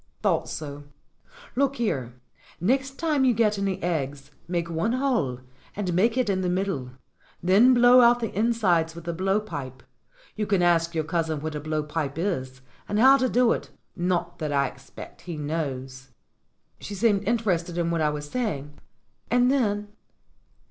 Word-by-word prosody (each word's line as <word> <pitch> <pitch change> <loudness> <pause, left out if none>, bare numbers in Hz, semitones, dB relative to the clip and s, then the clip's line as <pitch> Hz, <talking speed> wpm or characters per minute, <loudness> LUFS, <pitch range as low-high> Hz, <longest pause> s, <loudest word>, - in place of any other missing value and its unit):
"Thought - - +1
so. 145 -2 -6 0.7
Look 275 +1 +1
here, 135 - -2 0.4
next 265 +8 0
time 305 -4 +1
you 250 -3 +3
get 210 -2 +2
any 195 -1 -1
eggs, 145 -4 -3 0.2
make 170 -1 -1
one 170 +7 -1
hole, 235 - 0 0.3
and 190 -4 -2
make 225 +7 +2
it 255 -3 +2
in 190 -2 0
the 180 - 0
middle. 180 -9 -2 0.5
Then 215 +8 +6
blow 245 +1 +7
out 240 0 +5
the 225 -3 -4
insides 190 -7 +1
with 170 0 -10
a 170 - -1
blow 195 +4 +1
pipe. 135 - -7 0.5
You 210 -1 -2
can 195 -4 +2
ask 170 -1 +2
your 160 - +1
cousin 160 -1 -1
what 155 +1 -4
a 150 - -3
blow 155 0 -2
pipe 150 -1 -3
is 130 -8 -3 0.3
and 205 - 0
how 265 +5 +7
to 260 -1 +1
do 245 -1 +3
it - - -2 0.3
not 175 -1 -1
that 155 -2 -2
I 140 -1 +2
expect 135 +1 -13
he 165 - -4
knows." 135 -4 -4 0.7
She 205 - -7
seemed 205 -1 +1
interested 180 -7 0
in 170 -1 0
what 165 -1 0
I 150 - +3
was 150 0 -5
saying. 150 - -4 0.5
"And 245 +2 +3
then?" 210 -6 0
175 Hz, 170 wpm, -25 LUFS, 150-225 Hz, 0.7 s, blow